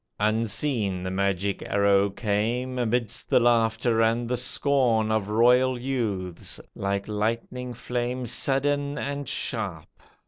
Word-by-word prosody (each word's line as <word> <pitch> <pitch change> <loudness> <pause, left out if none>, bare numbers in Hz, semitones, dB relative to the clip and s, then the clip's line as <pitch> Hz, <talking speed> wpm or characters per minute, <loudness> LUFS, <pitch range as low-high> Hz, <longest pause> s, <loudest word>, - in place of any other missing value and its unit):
Unseen 110 -2 0
the 95 - -3
magic 100 0 -1
arrow 100 0 +2
came, 115 +5 -1
Amidst 120 -2 -1
the - - +5
laughter 115 -1 +2
and 115 +1 +1
the 125 - 0
scorn 125 -3 +1
Of 110 -2 0
royal 125 +3 +4
youths, 105 -9 -3
like 100 0 -2
lightning 115 +4 -3
flame 125 +1 -3
Sudden 140 +4 +1
and 140 -1 -4
sharp. 100 -10 -3
115 Hz, 115 wpm, -26 LUFS, 100-125 Hz, -, the